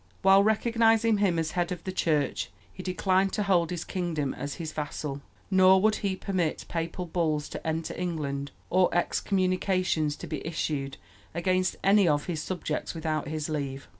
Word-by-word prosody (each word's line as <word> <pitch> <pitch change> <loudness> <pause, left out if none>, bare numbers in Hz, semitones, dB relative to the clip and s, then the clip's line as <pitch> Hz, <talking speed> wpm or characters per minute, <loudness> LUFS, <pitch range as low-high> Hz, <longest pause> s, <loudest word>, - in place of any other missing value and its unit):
While 195 +1 +7
recognizing 225 0 +3
him 190 -5 +2
as 160 -1 -1
head 175 0 -1
of 175 -2 -5
the 190 - -3
Church, 155 -6 0 0.2
he 185 - -8
declined 185 +1 +1
to 210 - 0
hold 175 -4 +2
his 175 -2 -3
kingdom 165 -7 -2
as 140 +2 -5
his 160 -2 -5
vassal, 145 -1 -4 0.3
nor 190 0 +6
would 215 +2 +3
he 195 -2 -1
permit 185 -5 -2
papal 170 +2 -3
bulls 160 -3 0
to - - -6
enter 160 0 -2
England 145 -5 -3 0.2
or 185 0 +4
excommunications 185 -4 +1
to - - -8
be - - -5
issued 150 -4 -3 0.4
against 185 +1 +1
any 200 -1 +5
of 145 -2 +2
his 165 -4 -3
subjects 170 -2 -3
without 155 -2 -2
his 155 0 -3
leave. 140 -3 -4
175 Hz, 165 wpm, -28 LUFS, 155-190 Hz, 0.4 s, While